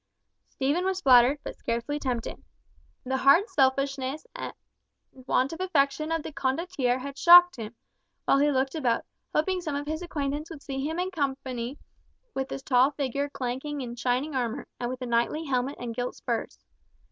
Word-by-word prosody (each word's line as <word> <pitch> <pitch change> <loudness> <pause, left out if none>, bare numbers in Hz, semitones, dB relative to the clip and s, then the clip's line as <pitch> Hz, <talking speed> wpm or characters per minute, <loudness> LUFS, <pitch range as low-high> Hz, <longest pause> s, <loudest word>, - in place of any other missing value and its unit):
Stephen 285 +6 0
was 380 0 0
flattered, 255 -3 +6
but - - -6
scarcely 235 +6 -2
tempted. 250 -5 -3 0.6
The 265 +1 -1
hard 280 - +5
selfishness 275 - 0
and - - -5 0.6
want 260 +2 0
of 330 - -6
affection 310 -3 +1
of 325 -2 0
the 310 - -7
Condottiere 270 -3 -1
shocked 355 +2 +8
him, 225 0 -7 0.5
while 275 - +4
he 290 +1 +4
looked 265 -1 0
about, 250 -7 0 0.3
hoping 365 +4 +1
some 305 -5 -3
of 285 +1 -3
his 315 +2 -3
acquaintance 300 -3 -3
would 315 -4 -10
see 270 -1 -4
him 320 +3 -2
in 365 +1 -1
company 265 -5 -3 0.6
with 265 0 -3
this 270 - -6
tall 255 -1 +4
figure 280 0 -2
clanking 270 +3 -4
in 240 -2 -5
shining 250 +5 -1
armour, 240 -3 -2
and 240 - -2
with 255 0 -5
a - - -2
knightly 240 +6 0
helmet 265 0 -1
and 240 -1 -4
gilt 245 +2 -3
spurs. - - -3
275 Hz, 170 wpm, -27 LUFS, 255-305 Hz, 0.6 s, shocked